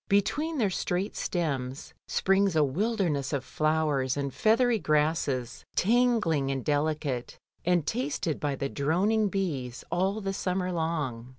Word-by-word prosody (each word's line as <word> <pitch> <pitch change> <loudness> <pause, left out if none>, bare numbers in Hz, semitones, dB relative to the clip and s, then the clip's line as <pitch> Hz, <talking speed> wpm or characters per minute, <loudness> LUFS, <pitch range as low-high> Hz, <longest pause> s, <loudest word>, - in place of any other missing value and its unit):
Between 295 +11 +1
their 210 -7 +2
straight 180 +2 -2
stems 140 -6 -3
springs 195 -1 +2
a 155 - +5
wilderness 165 - 0
of 135 -2 -1
flowers 150 -4 +1
and 140 -2 -2
feathery 230 +1 +3
grasses, 150 -6 0
tangling 210 - +2
and 135 -2 -2
delicate, 145 -4 -1 0.3
and 175 -3 +2
tasted 240 - -2
by 145 -2 -1
the 140 - -2
droning 190 +10 +1
bees 145 - -3
'all 190 +4 +1
the 195 -2 -3
summer 185 -1 -1
long. 150 -8 -2
165 Hz, 130 wpm, -28 LUFS, 140-200 Hz, 0.3 s, a